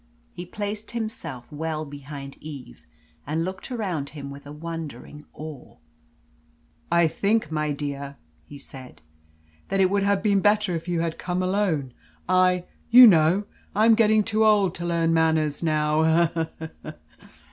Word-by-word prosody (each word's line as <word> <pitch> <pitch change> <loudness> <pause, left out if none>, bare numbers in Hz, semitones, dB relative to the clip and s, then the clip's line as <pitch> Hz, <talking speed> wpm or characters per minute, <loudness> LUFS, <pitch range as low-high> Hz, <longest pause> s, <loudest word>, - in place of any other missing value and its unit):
He 175 0 -8
placed 210 +2 -5
himself 165 - -6
well 155 +1 -3
behind 140 -1 -9
Eve, 140 - -11 0.4
and 160 +3 -1
looked 190 +7 -7
around 185 - -3
him 140 -2 -8
with 140 +1 -11
a - - -8
wondering 150 -2 -8
awe. 155 -4 -10 1.2
"I 170 -1 +4
think, 200 +1 0
my 150 -1 -1
dear," 140 -1 -5 0.3
he 145 - -12
said, 130 - -12 0.6
"that 195 - -1
it 190 -1 +4
would 200 0 +2
have 200 0 +1
been 200 -2 +3
better 205 -1 +2
if 165 +1 -6
you 175 -2 0
had 165 -1 -3
come 180 0 -2
alone. 185 -9 0 0.3
I 185 -1 +3 0.3
you 245 +2 +10
know 175 -1 +5 0.3
I 215 +2 +4
am 230 - +7
getting 215 -1 +4
too 220 0 +1
old 205 -4 +4
to 170 0 -5
learn 165 -1 +1
manners 160 -2 +1
now 155 -1 +1
eh 165 0 +2
he! 160 - -6 0.2
he! 155 - -6
165 Hz, 160 wpm, -24 LUFS, 150-195 Hz, 1.2 s, you